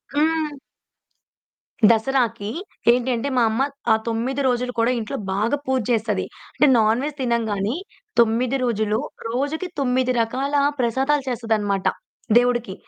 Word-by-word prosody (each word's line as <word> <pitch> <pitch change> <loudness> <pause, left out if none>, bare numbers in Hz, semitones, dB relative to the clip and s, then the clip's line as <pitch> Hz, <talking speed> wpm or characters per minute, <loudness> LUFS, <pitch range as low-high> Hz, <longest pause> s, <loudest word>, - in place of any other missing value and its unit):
హ్మ్. 310 -1 +1 1.3
దసరాకి 230 -2 +1 0.4
ఏంటంటే 245 +1 0
మా - - +4
అమ్మ 225 +4 -1 0.3
ఆహ్, 220 - +4
9 240 +5 -1
రోజులు 250 0 0
కూడా 230 +2 +3
ఇంట్లో 230 +5 -4 0.2
బాగా 220 +8 +1
పూజ 260 -1 +1
చేస్తది. 220 -4 0 0.3
అంటే 295 - +4
నాన్ 220 +2 +3
వెజ్ 295 -1 -3
తినంగానీ. 225 -3 0 0.4
9 235 +3 +3
రోజులు 215 -3 0 0.3
రోజుకి 285 +9 -2
9 255 -1 +1
రకాల 265 +5 -2 0.2
ప్రసాదాలు 265 +4 +1
చేస్తదన్నమాట. 220 -5 0 0.5
దేవుడికి 240 -5 +1
240 Hz, 115 wpm, -22 LUFS, 225-265 Hz, 1.3 s, మా